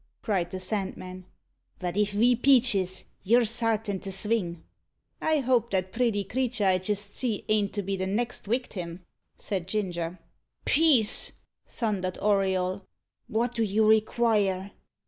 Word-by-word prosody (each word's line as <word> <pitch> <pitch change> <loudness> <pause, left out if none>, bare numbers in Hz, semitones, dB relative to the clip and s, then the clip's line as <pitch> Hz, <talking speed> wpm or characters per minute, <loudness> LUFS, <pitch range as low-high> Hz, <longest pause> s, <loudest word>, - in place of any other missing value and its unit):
cried 185 -6 0
the 185 - -5
Sandman; 185 -2 -4 0.5
"but 180 -1 -4
if 210 0 +2
ve 235 +5 +3
peaches 235 -8 +3 0.2
you're 235 +4 +3
sartin 225 -3 +1
to 195 - -5
sving." 190 -4 0 0.6
"I 315 -2 +2
hope 245 -2 +1
that 190 -1 -1
pretty 225 -3 0
creater 245 -3 -1
I 185 -1 +3
jist 205 +2 -2
see 230 -6 -1
ain't 210 -2 +2
to 205 - -2
be 195 +1 -2
the 190 0 -3
next 235 +5 -2
wictim?" 190 -7 -3 0.4
said 185 -4 -4
Ginger. 180 -4 -3 0.5
"Peace!" 280 -9 +4 0.3
thundered 195 -5 -3
Auriol. 190 -2 0 0.5
"What 240 +1 -1
do 230 - -1
you 215 0 +2
require?" 215 -3 +2
205 Hz, 135 wpm, -27 LUFS, 185-230 Hz, 0.6 s, Peace